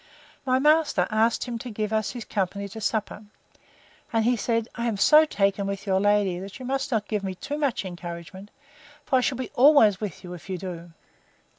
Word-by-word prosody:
My 255 0 +3
master 295 - +3
asked 220 +2 +2
him 240 -2 -5
to 250 - -7
give 215 -1 -3
him 220 0 +2
his 230 +2 -6
company 200 0 -2
to 220 +3 -9
supper; 215 0 -2 0.9
and 225 -1 +1
he 245 +1 +3
said, 230 0 -1
I 235 0 -3
am 220 -3 -1
so 305 +9 +6
taken 200 -6 0
with 200 0 -4
your 190 -1 +2
lady, 205 -3 +2
that 195 +1 -8
you 255 - -9
must 270 +2 -2
not 215 -3 0
give 210 -2 -2
me 190 -1 -4
too 290 +10 -5
much 275 -9 -1
encouragement; 175 +2 -8 0.6
for 265 - +2
I - - +3
shall 255 0 0
be 255 -3 -5
always 245 -8 +5
with 205 -5 -5
you, 180 -1 -8
if 180 +2 -11
you 185 - -2
do. 175 -2 -8
215 Hz, 205 wpm, -25 LUFS, 195-245 Hz, 0.9 s, so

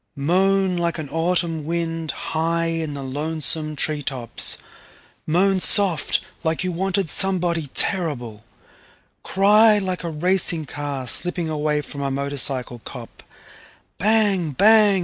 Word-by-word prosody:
Moan 185 +5 +1
like 170 0 -1
an 155 -3 -5
autumn 165 -1 -1
wind 165 0 -3
high 165 +2 -2
in 165 -3 -3
the 140 - -6
lonesome 155 +2 0
tree 150 +1 +1
tops, 130 -5 -2 0.7
moan 185 +4 +2
soft 195 -4 +4 0.2
like 160 +1 -1
you 185 - -1
wanted 190 +1 -1
somebody 175 -3 +1
terrible, 125 - -1 0.8
cry 210 +3 +4
like 185 -3 -3
a 170 - -3
racing 170 0 0
car 140 -1 -5
slipping 175 +6 0
away 150 -1 -1
from 140 0 -8
a 140 - -1
motorcycle 135 -3 -1
cop, - - -10 0.8
bang 205 -5 +2
bang! 210 - +5
165 Hz, 125 wpm, -21 LUFS, 150-185 Hz, 0.8 s, bang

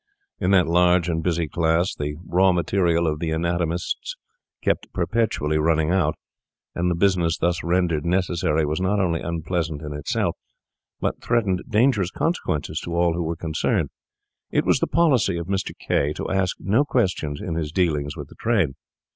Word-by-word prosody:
In 90 - 0
that 95 -3 +5
large 90 +1 +3
and 80 -1 0
busy 85 -1 0
class, 85 +3 +1
the 75 0 -4
raw 95 +2 +4
material 85 -1 +1
of 75 -2 -1
the 85 - -2
anatomists 85 - -2 0.5
kept - - 0
perpetually 75 -10 0
running 80 0 +2
out; 85 -5 +2 0.6
and 90 +1 0
the 85 - +1
business 85 -3 +2
thus 85 0 0
rendered 85 -3 +1
necessary 85 -3 +1
was 75 +4 -2
not 100 +2 +1
only 85 -4 0
unpleasant 80 -2 -3
in 75 -1 -5
itself, 75 0 -1 0.6
but - - -2
threatened 105 -6 +1
dangerous 110 -5 +3
consequences 130 - -2
to 85 - -5
all 85 -1 +3
who 85 - -2
were 85 0 -2
concerned. 80 -1 -1 0.6
It - - +1
was - - +3
the - - 0
policy 130 - +2
of 85 - -4
Mr. 95 +1 -1
K— 75 +2 0
to - - -5
ask 95 -1 0
no 110 +9 +2
questions 95 - -1
in 85 - -4
his 80 -2 -2
dealings 75 -5 0
with - - -7
the - - -14
trade. 105 - +2
85 Hz, 170 wpm, -23 LUFS, 80-95 Hz, 0.6 s, that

